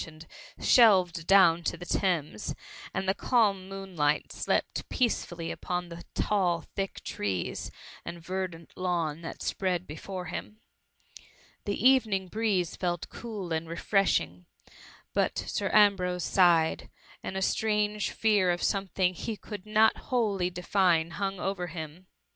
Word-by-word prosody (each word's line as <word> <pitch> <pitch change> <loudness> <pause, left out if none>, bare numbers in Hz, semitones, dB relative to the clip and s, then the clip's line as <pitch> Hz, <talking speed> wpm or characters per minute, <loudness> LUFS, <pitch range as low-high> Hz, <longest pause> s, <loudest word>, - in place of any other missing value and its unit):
tioned, 160 0 -12 0.3
shelved 185 -8 +5
down 175 -4 +6
to - - -2
the 175 - -9
Thames, 160 - -1 0.4
and 190 - -2
th« 190 +1 +1
calm 200 -6 +2
moonlight 185 -7 -1
slept - - -1
peacefully 175 -8 -1
upon 180 -1 -3
the 170 0 -9
tall, 180 -5 +1
thick 195 -1 -3
trees, 95 -4 -3 0.3
and 170 - -7
verdant 175 -1 -5
lawn 170 -4 -1
that 165 - -7
spread 185 -2 -1
be 150 - -8
fore 185 +2 -6
him. 210 +5 -6 1.1
The 200 - -1
evening 215 -8 +3
breeze 205 -6 0
felt 175 -2 -2
cool 205 -7 -6
and 160 0 -2
refreshing; 125 - 0 0.7
but - - +1
Sir - - -2
Ambrose 185 -4 +4
sighed, 170 -4 +3 0.3
and 190 - -5
a - - -2
strange 210 0 +1
fear 210 -4 +2
of 175 0 0
something 190 -2 +1
he 215 +4 -5
could 205 0 -9
not 215 +1 +4
wholly 205 -8 +1
define 175 -2 +1
hung 195 0 -3
over 190 -2 -2
him. 160 +2 -8
185 Hz, 135 wpm, -29 LUFS, 170-200 Hz, 1.1 s, down